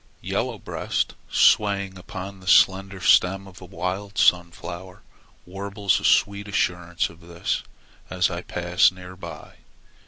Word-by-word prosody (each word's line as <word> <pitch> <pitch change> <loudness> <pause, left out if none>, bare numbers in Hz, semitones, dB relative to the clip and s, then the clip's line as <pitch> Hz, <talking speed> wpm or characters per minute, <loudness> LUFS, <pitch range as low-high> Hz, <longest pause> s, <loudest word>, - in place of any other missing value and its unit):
Yellow - - -2
Breast, - - -2 0.2
swaying 100 -2 +3
upon 95 +1 -8
the 95 - -15
slender 95 0 +4
stem 95 +2 +4
of 95 -1 -14
a - - -9
wild 95 +3 -4
sunflower, 90 +1 0 0.4
warbles 100 +1 -1
a - - -11
sweet 100 0 +3
assurance 90 -3 -1
of 85 - -17
this 85 0 -3 0.5
as 90 0 +1
I 85 0 -4
pass 90 0 +2
near 90 0 -11
by. 85 -4 -10
95 Hz, 130 wpm, -24 LUFS, 90-100 Hz, 0.5 s, slender